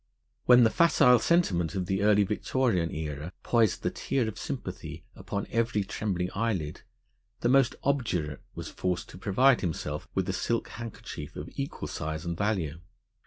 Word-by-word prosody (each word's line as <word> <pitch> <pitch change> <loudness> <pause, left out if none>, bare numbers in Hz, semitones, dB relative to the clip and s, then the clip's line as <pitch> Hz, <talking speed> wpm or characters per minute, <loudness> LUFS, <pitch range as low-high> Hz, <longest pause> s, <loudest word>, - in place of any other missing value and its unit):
When 125 0 +8
the 110 - +4
facile 145 -7 +5
sentiment 100 - +2
of 95 -2 -1
the 95 +1 -1
Early 105 0 +5
Victorian 105 -3 0
Era 75 +2 -5
poised 115 -6 +2
the - - 0
tear 130 -4 -1
of 110 -1 -5
sympathy 85 - -6
upon 100 0 -4
every 115 -2 +1
trembling 90 -3 -2
eyelid, 100 -9 -2 0.6
the 120 - +2
most 130 -2 +4
obdurate 95 - -1
was - - -6
forced 90 -1 -2
to 90 - -11
provide 125 +7 +4
himself 75 -4 -3
with - - 0
a - - -1
silk 115 -1 -1
handkerchief 115 -2 -8
of - - -7
equal 70 - -4
size 80 +2 -4
and 85 0 -2
value. 85 -6 -1
100 Hz, 160 wpm, -28 LUFS, 85-120 Hz, 0.6 s, When